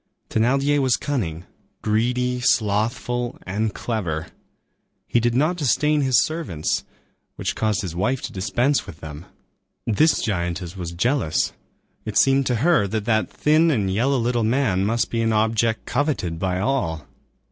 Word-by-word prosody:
Thénardier 135 Hz, +6 st, +2 dB
was 130 Hz, -3 st, +2 dB
cunning, 90 Hz, -, -3 dB, 0.4 s
greedy, 125 Hz, +3 st, +1 dB
slothful, 120 Hz, +1 st, 0 dB
and 105 Hz, +4 st, -1 dB
clever. 90 Hz, -10 st, -2 dB, 0.8 s
He 120 Hz, -, +2 dB
did 120 Hz, 0 st, +1 dB
not 155 Hz, +7 st, +2 dB
disdain 150 Hz, 0 st, +2 dB
his 130 Hz, -3 st, +4 dB
servants, 155 Hz, -, -2 dB, 0.5 s
which -, -, -2 dB
caused 110 Hz, -2 st, 0 dB
his 85 Hz, -3 st, -5 dB
wife 125 Hz, +9 st, 0 dB
to 125 Hz, -, -4 dB
dispense 120 Hz, +8 st, 0 dB
with 80 Hz, -, -10 dB
them. 80 Hz, +1 st, -9 dB, 0.6 s
This 150 Hz, +9 st, +3 dB
giantess 90 Hz, -3 st, -2 dB
was 90 Hz, -3 st, -5 dB
jealous. 115 Hz, -, 0 dB, 0.5 s
It -, -, -3 dB
seemed 135 Hz, 0 st, +4 dB
to 125 Hz, -, +1 dB
her 170 Hz, -13 st, +4 dB
that 105 Hz, +1 st, -3 dB
that 110 Hz, -1 st, +1 dB
thin 155 Hz, +2 st, +3 dB
and 100 Hz, -10 st, +1 dB
yellow 130 Hz, +7 st, +2 dB
little 120 Hz, -1 st, 0 dB
man 110 Hz, -5 st, +1 dB
must 115 Hz, +2 st, 0 dB
be 115 Hz, -, 0 dB
an 115 Hz, -1 st, +1 dB
object 110 Hz, +1 st, +1 dB
coveted 115 Hz, -, -1 dB
by 90 Hz, 0 st, -1 dB
all. 95 Hz, -, -1 dB
115 Hz, 145 wpm, -23 LUFS, 95-135 Hz, 0.8 s, his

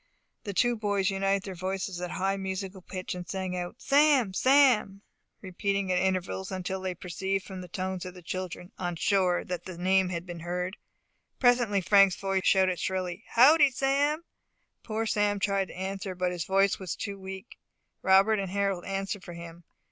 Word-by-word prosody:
The 200 Hz, -, -4 dB
two 240 Hz, +3 st, +3 dB
boys 205 Hz, -3 st, 0 dB
united 195 Hz, 0 st, 0 dB
their 195 Hz, -, -6 dB
voices 185 Hz, 0 st, -4 dB
at 180 Hz, -, -3 dB
a -, -, -6 dB
high 195 Hz, +1 st, 0 dB
musical 190 Hz, 0 st, -5 dB
pitch, 185 Hz, +1 st, -6 dB
and 180 Hz, -1 st, -7 dB
sung 190 Hz, -1 st, -3 dB
out, 175 Hz, +2 st, -4 dB
"Sam! 280 Hz, -7 st, +4 dB
Sam!" 250 Hz, -6 st, +4 dB, 0.4 s
repeating 195 Hz, +1 st, -1 dB
it 180 Hz, -, +2 dB
at -, -, +1 dB
intervals 190 Hz, 0 st, -1 dB
until 190 Hz, 0 st, -3 dB
they 185 Hz, -1 st, -3 dB
perceived 190 Hz, +2 st, -3 dB
from 190 Hz, -2 st, -7 dB
the 180 Hz, -, -9 dB
tones 185 Hz, -1 st, -4 dB
of 185 Hz, 0 st, -8 dB
the 180 Hz, -, -12 dB
children 180 Hz, +1 st, -5 dB
on 175 Hz, -2 st, -2 dB
shore 185 Hz, 0 st, +2 dB
that 180 Hz, -1 st, -5 dB
the 185 Hz, -2 st, -8 dB
name 190 Hz, +1 st, +2 dB
had 175 Hz, -1 st, -4 dB
been 175 Hz, -2 st, -7 dB
heard. 180 Hz, +3 st, -3 dB, 0.6 s
Presently 240 Hz, -5 st, +3 dB
Frank's 195 Hz, -1 st, +5 dB
voice 195 Hz, -1 st, -1 dB
shouted 185 Hz, -3 st, +3 dB
shrilly, 185 Hz, +2 st, -3 dB
"Howdy, 285 Hz, +5 st, +6 dB
Sam?" 280 Hz, +4 st, +1 dB, 0.6 s
Poor 220 Hz, 0 st, -3 dB
Sam 205 Hz, -1 st, +1 dB
tried 195 Hz, -1 st, 0 dB
to -, -, -11 dB
answer, 190 Hz, 0 st, -4 dB
but 180 Hz, 0 st, 0 dB
his 175 Hz, -2 st, -3 dB
voice 195 Hz, +1 st, +2 dB
was 185 Hz, -4 st, -4 dB
too 200 Hz, -1 st, -5 dB
weak. 190 Hz, +3 st, -9 dB, 0.4 s
Robert 195 Hz, +3 st, +4 dB
and 195 Hz, -2 st, -3 dB
Harold 195 Hz, -2 st, -1 dB
answered 195 Hz, 0 st, -3 dB
for 175 Hz, -, -9 dB
him. 170 Hz, 0 st, -10 dB
190 Hz, 185 wpm, -28 LUFS, 180-200 Hz, 0.6 s, Howdy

